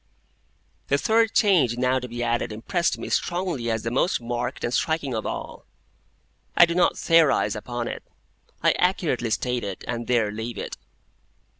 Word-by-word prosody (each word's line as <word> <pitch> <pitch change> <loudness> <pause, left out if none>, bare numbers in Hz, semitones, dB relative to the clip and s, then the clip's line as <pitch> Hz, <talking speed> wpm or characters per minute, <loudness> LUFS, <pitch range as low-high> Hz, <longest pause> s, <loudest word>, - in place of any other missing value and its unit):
The 140 - +2
third 225 +6 +2
change 165 - +3
now 125 +1 +2
to 125 - -7
be 120 0 -4
added 120 -1 -1
impressed 170 - -1
me - - -6
strongly 175 -9 -1
as 110 -1 -1
the 115 - -2
most 135 +8 +1
marked 120 +1 -4
and 120 - -1
striking 160 -4 0
of 110 - -2
all. - - -6 0.9
I 175 - +9
do 170 - -3
not 175 +1 +2
theorise 165 -8 +3
upon 120 +2 -4
it; - - -5 0.6
I - - +5
accurately 165 -10 +1
state 125 +2 -1
it, 100 -2 -6
and 120 -1 -4
there 115 -4 +2
leave 110 +3 -5
it. - - -5
125 Hz, 165 wpm, -24 LUFS, 120-165 Hz, 0.9 s, I